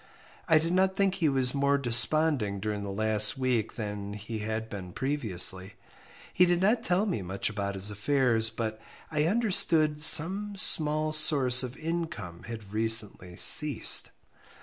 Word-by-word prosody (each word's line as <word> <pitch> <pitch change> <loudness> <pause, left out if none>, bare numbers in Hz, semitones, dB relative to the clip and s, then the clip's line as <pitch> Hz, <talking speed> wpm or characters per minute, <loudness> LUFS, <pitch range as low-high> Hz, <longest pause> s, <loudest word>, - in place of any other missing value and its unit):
I 160 -3 +4
did 165 +3 -2
not 190 +1 0
think 195 -1 0
he 165 -6 -1
was 130 -2 0
more 140 0 0
desponding 125 -3 0
during 105 0 -5
the 100 - -7
last 110 +2 0
week 125 -4 -3
than 105 -3 -7
he 110 +2 -8
had 110 +1 -5
been 95 -5 -10
previously. 95 -8 0 0.6
He 180 0 +3
did 175 0 0
not 215 +5 0
tell 185 0 -1
me 185 - -4
much 95 +3 -4
about 100 -1 -5
his 95 +2 +1
affairs, 115 0 0
but 110 -1 -6 0.3
I 150 -1 -1
understood 165 -7 0
some 190 +7 +3
small 155 -4 +1
source 140 -5 +4
of 125 +1 -8
income 155 - -7
had 110 -3 -10
recently 110 -5 0
ceased. 150 +9 +4
125 Hz, 150 wpm, -26 LUFS, 105-155 Hz, 0.6 s, I